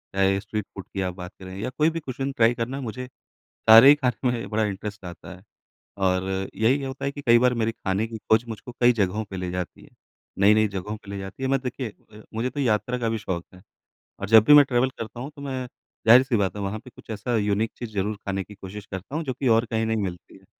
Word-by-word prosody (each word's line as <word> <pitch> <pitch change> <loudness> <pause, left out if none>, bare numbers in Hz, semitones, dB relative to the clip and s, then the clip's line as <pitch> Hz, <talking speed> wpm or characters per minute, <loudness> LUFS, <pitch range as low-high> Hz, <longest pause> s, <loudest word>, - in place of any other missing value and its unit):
चाहे 95 0 +3
street 105 -1 -4
food 95 - -7
की 95 - -2
आप 90 -1 -2
बात 90 0 -8
करें 95 0 -9
या 105 - -3
कोई 155 +1 +4
भी 165 0 -4
कुज़ीन 135 -1 -4
ट्राई 115 -2 +3
करना 120 +3 -3
मुझे 125 +1 -5 0.6
सारे 115 +5 +10
ही 145 - +10
ख़ाने 125 -3 0
में 120 -1 -3
बड़ा 110 0 +1
इंटरेस्ट 100 0 -5
आता 90 0 -9
है। 90 - -16 0.6
और 95 -1 +2 0.3
यही 130 +6 +2
होता 135 +1 -5
है 140 - 0
कि 145 0 -8
कई 120 -2 +5
बार 125 0 +3
मेरी 115 -1 0
ख़ाने 100 0 -2
की 115 0 -7
ख़ोज 110 +1 +2
मुझको 115 +2 -8
कई 120 0 +6
जगहों 105 -1 0
पर 95 -2 -8
ले 90 -1 -3
जाती 90 -1 -5
है, - - -17 0.5
नई-नई 105 +2 +5
जगहों 100 +2 -5
पे 105 - -15
ले 100 - -4
जाती 95 +7 -7
है। 130 - 0
मैं 135 -1 +2
देखिए, 125 -1 -4 0.2
अ, 105 0 -13
मुझे 115 +3 -1
तो 145 +3 -7
यात्रा 125 0 +1
का 115 -2 0
भी 115 - -1
शौक 90 -4 -4
है। 90 - -15 0.6
और 100 - -4
जब 110 -1 +8
भी 150 - +9
मैं 145 -1 +9
ट्रैवल 125 0 +1
करता 115 -2 -8
हूँ 135 +5 -6
तो 140 - -11
मैं 130 -2 -4 0.4
ज़ाहिर-सी 125 +2 +7
बात 100 -1 0
है 105 - -5
वहाँ 100 +2 -3
पे 125 - -14
कुछ 115 - -18
ऐसा 110 +3 -2
यूनिक 105 +1 0
चीज़ 120 - -6
ज़रूर 105 +2 -1
ख़ाने 95 -1 -3
की 105 - -14
कोशिश 100 +1 -9
करता 95 - -6
हूँ 165 - -1
जो 130 - -3
कि 135 - -2
और 115 - +1
कहीं 110 0 -1
नहीं 110 0 0
मिलती 90 -2 -7
है। - - -23
110 Hz, 255 wpm, -25 LUFS, 100-125 Hz, 0.6 s, सारे